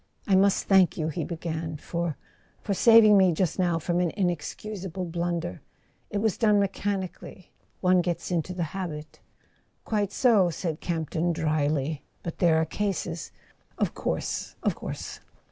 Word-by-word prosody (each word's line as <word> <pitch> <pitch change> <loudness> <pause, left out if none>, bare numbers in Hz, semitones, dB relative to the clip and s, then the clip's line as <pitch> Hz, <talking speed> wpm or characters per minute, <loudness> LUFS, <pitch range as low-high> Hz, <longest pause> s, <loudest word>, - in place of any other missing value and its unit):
"I 200 - +1
must 195 +1 +3
thank 190 -3 +4
you," 155 -1 -1
he 160 +1 -3
began, 160 -1 -4
"for—for 170 +5 -5
saving 215 -1 +7
me 185 -2 +5
just 180 +2 -1
now 175 -2 +2
from 175 +2 -1
an 180 -1 +2
inexcusable 185 +1 -3
blunder. 170 - -3 0.5
It - - -2
was 210 -1 0
done 210 -3 +4
mechanically... 195 -1 -3 0.3
one 185 -1 +4
gets 175 +1 -3
into 175 +1 -1
the 175 - -1
habit.. 155 -5 -6 0.3
." - - -41
"Quite 205 -3 0
so," 215 -8 +4
said 165 -2 -3
Campton 170 0 -1
drily. 155 -2 0 0.2
"But 170 - -6
there 165 -3 +4
are 160 - +2
cases 175 -2 -3 0.2
" - - -38
"Of - - 0
course—of - - -2
course." - - -7
175 Hz, 145 wpm, -27 LUFS, 160-195 Hz, 0.5 s, saving